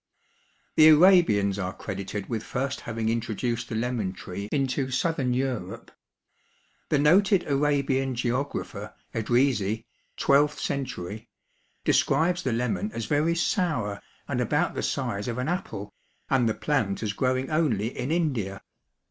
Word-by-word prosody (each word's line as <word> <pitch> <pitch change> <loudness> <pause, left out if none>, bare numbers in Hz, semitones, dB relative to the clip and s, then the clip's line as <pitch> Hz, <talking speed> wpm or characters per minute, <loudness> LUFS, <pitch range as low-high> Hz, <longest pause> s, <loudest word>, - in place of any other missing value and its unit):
The 155 - +9
Arabians 155 - +5
are 95 -1 -2
credited 100 0 -5
with 115 -2 -2
first 130 +4 -3
having 115 -1 -3
introduced 115 +1 -2
the - - -3
lemon 115 -4 -1
tree 100 +2 -7
into 135 -1 0
southern 130 -1 0
Europe. 125 -8 -3 1.0
The 150 - +3
noted 185 +6 +4
Arabian 140 -2 +1
geographer, 125 +4 -3 0.2
Edrisi, 115 -2 +1 0.3
twelfth 145 +1 +3
century, 120 -6 -4 0.6
describes 175 +2 +2
the 130 - -1
lemon 125 - -1
as 115 - -3
very 155 +5 +1
sour 150 - 0 0.3
and - - -1
about - - +1
the - - -3
size 100 0 -2
of 120 -1 -3
an 125 +2 -2
apple 175 - -4 0.4
and 125 -4 +3
the 110 - -1
plant 115 -7 -1
as 105 -2 -1
growing 130 +5 0
only 125 -8 +1
in 125 +2 -3
India. 130 - -1
125 Hz, 130 wpm, -26 LUFS, 110-145 Hz, 1.0 s, The